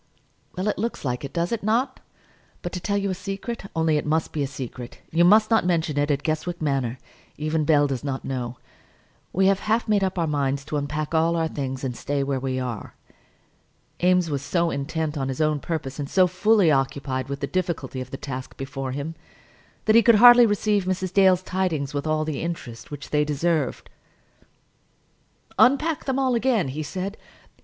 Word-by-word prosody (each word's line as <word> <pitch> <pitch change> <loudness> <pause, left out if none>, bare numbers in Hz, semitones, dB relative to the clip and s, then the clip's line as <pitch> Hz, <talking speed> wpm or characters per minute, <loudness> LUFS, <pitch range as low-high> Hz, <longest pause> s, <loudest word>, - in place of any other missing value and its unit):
"Well, 185 +3 -1
it 210 - -1
looks 230 -7 -3
like 125 0 -2
it, 140 - -5
does 170 0 -1
it 230 - -1
not? 240 +6 0 0.6
But, 175 - -3
to 180 - -4
tell 200 +3 -1
you 200 -1 -1
a - - 0
secret, 195 +4 -5
only 160 -1 +2
it - - -2
must 160 +1 0
be 150 - -2
a 140 - 0
secret; 125 -3 -7
you 170 +2 +3
must 215 +5 +5
not 225 - +4
mention 165 -4 0
it 145 +1 +1
at 145 -1 0
Guestwick 160 +2 -2
Manor; 135 -5 -1 0.4
even 155 0 -1
Bell 145 -1 +4
does 135 -3 -3
not 135 -2 -4
know; 125 -2 -4 0.7
we 190 +2 +2
have 195 0 +4
half 220 +3 0
made 210 -2 +2
up 190 0 -1
our 170 - +1
minds 140 -2 -1
to 150 - -2
unpack 150 +2 -3
all 165 +1 +3
our 165 -1 +1
things 135 -4 -4
and 125 -2 -2
stay 140 +3 -2
where 135 -1 -1
we 130 0 -2
are." 125 -4 -5 1.1
Eames 180 -2 +3
was 140 -2 -1
so 170 +4 0
intent 155 +1 -2
on 135 - -1
his 135 -1 -4
own 155 -1 +2
purpose, 155 -3 -4
and 140 -1 -4
so 185 -1 +5
fully 185 0 +3
occupied 135 -1 -1
with 140 0 -4
the 140 - -1
difficulty 160 -6 -3
of 130 - -7
the 135 - -6
task 130 -2 -7
before 135 -1 -5
him, 145 +4 -4 0.7
that 220 - +4
he 230 - +8
could 230 0 +6
hardly 240 +2 +9
receive 205 -1 +1
Mrs. 185 0 -2
Dale's 185 -2 +5
tidings 170 -8 -1
with 145 +2 -2
all 155 0 +1
the 155 -3 -3
interest 120 -9 -6
which 145 -1 -8
they 150 0 +3
deserved. 155 +2 -1 1.7
"Unpack 290 +5 +3
them 265 -1 0
all 265 -2 +2
again," 230 - +1
he 145 +4 -4
said. 190 +6 -4
160 Hz, 200 wpm, -24 LUFS, 140-190 Hz, 1.7 s, hardly